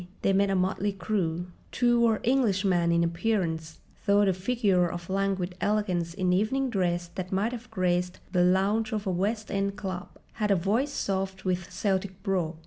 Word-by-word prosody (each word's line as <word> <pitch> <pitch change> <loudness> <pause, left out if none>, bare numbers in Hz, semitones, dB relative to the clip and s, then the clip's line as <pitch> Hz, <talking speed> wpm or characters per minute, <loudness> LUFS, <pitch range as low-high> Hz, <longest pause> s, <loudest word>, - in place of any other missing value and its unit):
They 195 - +3
made 200 +1 +3
a 195 - +1
motley 190 +2 0
crew. 180 -4 -1 0.3
Two 240 -1 +3
were 225 -2 +3
Englishman 195 -9 +2
in 170 0 +3
appearance, 170 -3 -1 0.3
though 205 0 +5
the 190 - +3
figure 185 -3 +1
of 175 +1 -6
languid 195 -2 0
elegance 180 -5 0
in 185 -2 +1
evening 250 +7 +1
dress 175 -4 0
that 185 -1 -5
might 200 +5 +1
have 245 0 -8
graced 180 -3 0
the 180 - +2
lounge 200 +5 +2
of 210 -1 -2
a 190 - 0
West 210 +5 -1
End 200 0 -1
club 190 -2 -5 0.3
had 210 - +2
a 200 - +5
voice 215 +11 +1
soft 195 -5 -2
with 180 -1 -1
Celtic 190 -1 -2
brogue. 180 -5 -1
195 Hz, 175 wpm, -28 LUFS, 180-210 Hz, 0.3 s, though